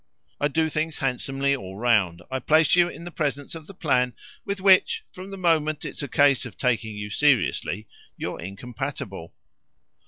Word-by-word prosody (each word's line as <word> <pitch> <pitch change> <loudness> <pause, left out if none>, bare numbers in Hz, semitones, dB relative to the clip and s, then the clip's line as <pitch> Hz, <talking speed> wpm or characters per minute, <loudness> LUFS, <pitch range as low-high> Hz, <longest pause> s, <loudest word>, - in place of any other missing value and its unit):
I 145 - +2
do 160 +2 +1
things 155 +1 -2
handsomely 135 +1 0
all 95 -7 -8
round 100 -7 +2
I 130 - -1
place 155 +5 +4
you 175 -1 +4
in 170 - -9
the 175 - -7
presence 145 -4 -2
of 160 -2 -8
the 195 - -11
plan 125 - +1 0.3
with 200 0 -3
which, 190 -1 +4
from 185 +1 -9
the 195 - -7
moment 155 -4 +1
it's - - -4
a 140 - -3
case 140 0 +4
of - - -9
taking 115 -4 0
you 105 0 -5
seriously, 110 -6 +1 0.3
you're - - -4
incompatible. 100 -2 -6
140 Hz, 175 wpm, -25 LUFS, 115-160 Hz, 0.3 s, place